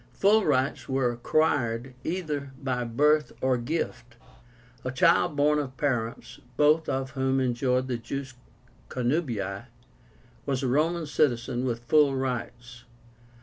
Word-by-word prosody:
Full 205 +7 +3
rights 135 -2 0
were 130 -2 +1
acquired 120 -1 0
either 150 -6 -3
by 130 -3 -2
birth 150 +6 +2
or 130 0 +2
gift. 120 -3 -4 0.7
A 130 - -2
child 165 +3 +3
born 150 +1 +3
of 135 -3 -5
parents, 120 -6 -2 0.2
both 150 +2 +4
of 135 0 -2
whom 135 -1 0
enjoyed 130 0 0
the 125 -2 -2
jus 135 +2 -6 0.6
connubii, 120 - -2 0.8
was 135 -1 -1
a - - +1
Roman 160 +6 +1
citizen 125 -4 0
with 120 -2 -2
full 145 0 +4
rights. 125 -2 -4
130 Hz, 125 wpm, -27 LUFS, 120-150 Hz, 0.8 s, both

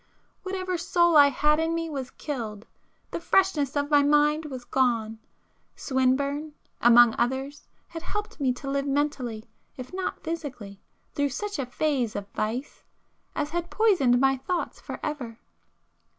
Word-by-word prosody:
Whatever 370 -2 -3
soul 345 -1 +3
I 290 -1 +9
had 300 +3 +2
in 325 +1 0
me 330 0 -2
was 275 -5 -5
killed; 225 -8 -6 0.5
the - - -3
freshness 335 -6 +2
of 285 +1 -1
my 290 -1 +6
mind 295 +2 +3
was 260 -4 -7
gone,—Swinburne, 260 +4 -1 0.3
among 240 -1 +7
others, 265 +4 -2 0.2
had 330 - -7
helped 420 +1 -5
me 265 -3 +2
to 260 +2 -9
live 275 +1 -1
mentally, 275 -6 -1 0.3
if 255 +5 -8
not 375 0 -4
physically, 270 - -6 0.3
through 285 0 0
such 410 +6 -4
a 265 - -2
phase 255 -4 -1
of 200 -1 -4
vice 230 +8 -4 0.5
as 295 0 -2
had 345 0 -3
poisoned 355 - +3
my 270 0 +3
thoughts 340 +7 -3
for - - -7
ever. 255 -7 -4
285 Hz, 145 wpm, -26 LUFS, 250-320 Hz, 0.5 s, I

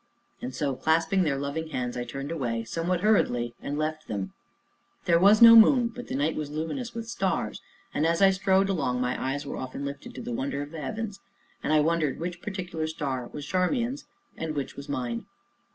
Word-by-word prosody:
And 125 - -4
so, 140 -1 -1
clasping 160 +7 +2
their 150 -6 +1
loving 140 +4 -3
hands, 125 -5 -3
I 120 -1 -3
turned 135 +4 -5
away, 120 -8 -2
somewhat 170 +8 -1
hurriedly, 125 - +2
and 145 - -3
left 155 0 -2
them. 95 -3 -4 0.7
There 170 -1 +4
was 205 +5 +7
no 230 0 +11
moon, 235 +2 +7
but 245 +1 -9
the - - -4
night 145 +3 +1
was 150 -2 -3
luminous 165 - -4
with 230 -1 -5
stars, 230 - -1 0.3
and, 150 - 0
as 165 +1 +2
I 195 -1 +6
strode 190 0 +2
along, 140 -10 0
my 125 0 -1
eyes 135 +2 -2
were - - -5
often 130 +2 -5
lifted 140 - -7
to - - -6
the 240 +1 -4
"wonder 265 - -2
of 145 - -10
the 160 -2 -6
heavens," 210 +6 -4 0.4
and - - -1
I 155 -1 +5
wondered 155 -3 +1
which 175 +1 -4
particular 180 -5 -4
star 135 -6 -3
was 145 -1 -6
Charmian's 235 - 0 0.3
and 160 -1 -4
which 140 -2 -3
mine. 120 -4 -3
160 Hz, 200 wpm, -27 LUFS, 140-195 Hz, 0.7 s, no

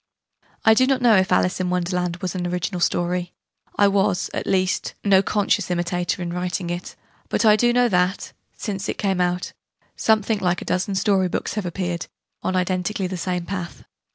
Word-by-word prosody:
I 220 - +8
do 255 +3 +4
not 265 -2 +1
know 235 -3 +6
if 190 -1 +2
'Alice 180 +1 +2
in 185 -1 -1
Wonderland' 180 0 -1
was 185 - -2
an 180 -2 -2
original 180 +1 -2
story 175 0 0 0.4
I 205 - +5
was, 195 -2 +1
at - - -3
least, 185 -1 0
no 195 -2 +5
conscious 205 -1 0
imitator 175 +1 -1
in 170 0 -4
writing 180 0 -2
it 175 +1 -6 0.3
but - - +1
I 210 -1 +7
do 240 +3 +3
know 245 0 +3
that, 180 -2 0 0.2
since 200 -1 -4
it - - -3
came 190 -3 0
out, 180 0 -1 0.4
something 220 -1 +2
like 180 -2 0
a - - -8
dozen 190 +2 -1
story 195 -1 +2
books - - -3
have 210 -4 -3
appeared, 175 -1 -3 0.3
on 185 - -1
identically 185 +2 -1
the 185 +1 -3
same 180 0 -2
pattern. 170 - -6
185 Hz, 185 wpm, -22 LUFS, 180-200 Hz, 0.4 s, I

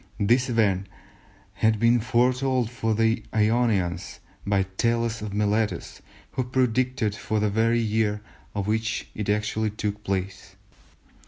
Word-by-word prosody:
This 120 +5 +3
event 100 -5 +1 0.7
had 110 0 +2
been 115 +2 +4
foretold 125 +1 +1
to 110 -2 +1
the 115 +1 +2
Ionians 105 -6 +1 0.3
by 100 -1 +2 0.2
Thales 115 -1 +1
of 105 -1 -5
Miletus, 105 +1 -1 0.3
who 130 - -1
predicted 125 -2 0
for 110 0 -3
it - - +1
the 105 -1 +1
very 115 +2 +2
year 105 -1 0 0.3
in 100 - -1
which 110 +2 -1
it 105 -1 -4
actually 105 +1 0
took 105 0 -4
place. 95 -1 -4
110 Hz, 135 wpm, -25 LUFS, 105-115 Hz, 0.7 s, been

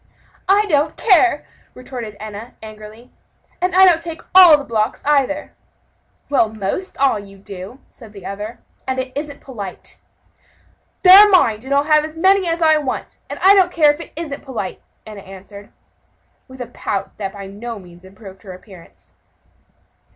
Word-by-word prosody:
"I 405 +2 +4
don't 300 -6 0
care," 365 -7 +3 0.3
retorted 240 -5 -8
Enna, 215 +2 -9
angrily, 215 +2 -12 0.5
"and 365 0 -1
I 380 +1 +7
don't 340 -3 +4
take 330 -1 -7
all 360 -5 +9
the 285 - -7
blocks, 220 -4 -2
either." 295 0 0 0.7
"Well, 270 -6 +2
most 220 - -5
all, 270 -6 +2
you 195 -1 -13
do," 195 +3 -10
said 225 -4 -15
the 200 -3 -13
other, 210 +3 -7 0.3
"and 260 0 -2
it 260 0 -4
isn't 290 0 -6
polite." 205 -8 -9 1.0
"They're 395 +3 +9
mine, 240 - +3
and 270 - -8
I'll 280 0 +3
have 305 0 +3
as 310 +1 -8
many 380 +2 +3
as 330 0 -1
I 315 -1 +5
want; 280 -4 -5
and - - -6
I 385 +1 +7
don't 375 -3 +3
care 305 -4 +4
if 295 - -12
it - - -11
isn't 300 -3 -6
polite," 225 -8 -6 0.2
Enna 210 -2 -10
answered, 195 +1 -13 0.8
with 260 0 -12
a - - -4
pout 200 -3 -5
that 195 -2 -5
by 200 -1 -9
no 220 +4 -8
means 175 -2 -15
improved 190 0 -14
her 190 -1 -10
appearance. 185 -2 -17
255 Hz, 165 wpm, -18 LUFS, 205-315 Hz, 1.0 s, all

